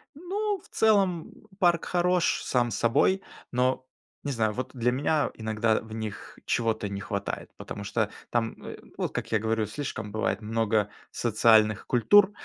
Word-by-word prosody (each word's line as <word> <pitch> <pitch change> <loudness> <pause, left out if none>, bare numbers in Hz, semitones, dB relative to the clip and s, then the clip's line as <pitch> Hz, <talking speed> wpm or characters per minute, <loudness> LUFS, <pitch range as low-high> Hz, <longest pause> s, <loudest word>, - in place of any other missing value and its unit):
Ну, 400 +6 -2
в - - -18
целом, 195 -6 +2 0.3
парк 175 -3 +3
хорош 180 0 +1
сам 120 -2 +1
собой, 130 - +2 0.3
но, 130 +1 +1 0.4
не 145 - -2
знаю, 110 -4 +1
вот 130 +3 -4
для 125 -1 +1
меня 145 +2 +1
иногда 110 0 0
в 110 -1 -11
них 110 -2 -6
чего-то 110 -3 0
не 100 0 -4
хватает. 100 -1 -4
Потому 100 - -7
что 105 +1 -1 0.2
там, 115 -1 0
э, - - -7 0.2
вот - - -1
как - - -4
я 110 - +3
говорю, 110 0 0
слишком 105 -1 -5
бывает 110 +1 -1
много 110 -1 +1 0.2
социальных 110 -2 +3
культур, 195 - +5
115 Hz, 155 wpm, -27 LUFS, 110-160 Hz, 0.4 s, культур